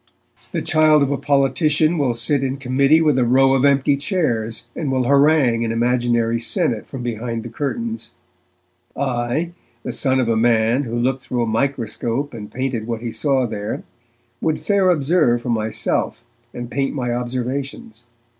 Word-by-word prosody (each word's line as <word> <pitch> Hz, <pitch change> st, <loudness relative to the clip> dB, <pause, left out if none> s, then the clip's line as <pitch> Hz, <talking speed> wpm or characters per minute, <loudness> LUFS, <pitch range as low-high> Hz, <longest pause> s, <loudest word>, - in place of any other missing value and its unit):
The -, -, -2 dB
child 155 Hz, -2 st, +4 dB
of 140 Hz, -, 0 dB
a 140 Hz, -, 0 dB
politician 150 Hz, +3 st, +2 dB
will 130 Hz, -5 st, +1 dB
sit 130 Hz, +4 st, +1 dB
in 135 Hz, 0 st, -2 dB
committee 140 Hz, +4 st, +3 dB
with 150 Hz, -4 st, +3 dB
a -, -, +3 dB
row 135 Hz, +2 st, +4 dB
of 135 Hz, -1 st, +2 dB
empty 140 Hz, 0 st, +3 dB
chairs, 125 Hz, -, -1 dB
and 145 Hz, -4 st, -2 dB
will 130 Hz, -1 st, +1 dB
harangue 140 Hz, -3 st, +3 dB
an 115 Hz, -, -1 dB
imaginary 120 Hz, -1 st, +1 dB
senate 115 Hz, -1 st, 0 dB
from 130 Hz, -3 st, -7 dB
behind 115 Hz, -1 st, -3 dB
the 120 Hz, -, -7 dB
curtains. 225 Hz, -, -4 dB, 0.8 s
I, 130 Hz, +5 st, -1 dB, 0.3 s
the -, -, -4 dB
son 130 Hz, -2 st, +1 dB
of 125 Hz, -, +1 dB
a 115 Hz, -, +2 dB
man 115 Hz, +3 st, +2 dB
who 115 Hz, 0 st, -4 dB
looked 130 Hz, +2 st, 0 dB
through 125 Hz, -1 st, -2 dB
a -, -, 0 dB
microscope 120 Hz, +2 st, -2 dB
and 105 Hz, -3 st, -8 dB
painted 125 Hz, -4 st, -3 dB
what 115 Hz, -2 st, -3 dB
he 120 Hz, -, -3 dB
saw 135 Hz, -2 st, +1 dB
there, 105 Hz, -2 st, -4 dB, 0.6 s
would 160 Hz, -1 st, 0 dB
fair 200 Hz, -2 st, +2 dB
observe 140 Hz, -7 st, +2 dB
for -, -, -4 dB
myself, 110 Hz, +1 st, -1 dB, 0.3 s
and 120 Hz, 0 st, -7 dB
paint 135 Hz, +1 st, -1 dB
my 125 Hz, -3 st, -1 dB
observations. 125 Hz, -1 st, -4 dB
130 Hz, 165 wpm, -20 LUFS, 120-140 Hz, 0.8 s, child